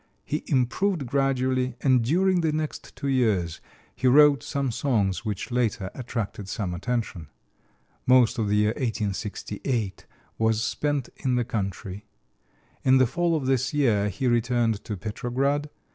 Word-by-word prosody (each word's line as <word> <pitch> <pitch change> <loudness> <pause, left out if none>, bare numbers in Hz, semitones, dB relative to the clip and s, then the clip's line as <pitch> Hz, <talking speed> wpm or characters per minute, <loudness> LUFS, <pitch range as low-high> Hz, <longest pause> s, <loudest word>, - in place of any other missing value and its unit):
He 150 - -2
improved 140 +6 +1
gradually, 130 -1 0
and 130 -3 +4
during 180 +7 +2
the 160 -2 +1
next 155 0 -4
two 140 - -4
years 105 -11 +1 0.3
he 130 - 0
wrote 145 +2 +6
some 140 -3 -2
songs 110 -7 0
which 105 +1 -4
later 115 -5 0
attracted 115 -5 -5
some 95 -6 -3
attention. 105 -4 -3 0.8
Most 125 -2 +5
of 110 - +1
the 105 - +2
year 105 0 +3
1868 110 -1 -3 0.3
was 110 0 +2
spent 145 +1 -1
in 130 -2 0
the 120 -1 +1
country. 100 -1 -4 0.8
In 130 0 +5
the 130 - +5
fall 170 +6 0
of 145 -4 -2
this 130 +1 +1
year 110 -8 +2
he 105 +7 -4
returned 120 -2 +1
to 105 - -4
Petrograd. 130 - -1
125 Hz, 145 wpm, -26 LUFS, 105-135 Hz, 0.8 s, wrote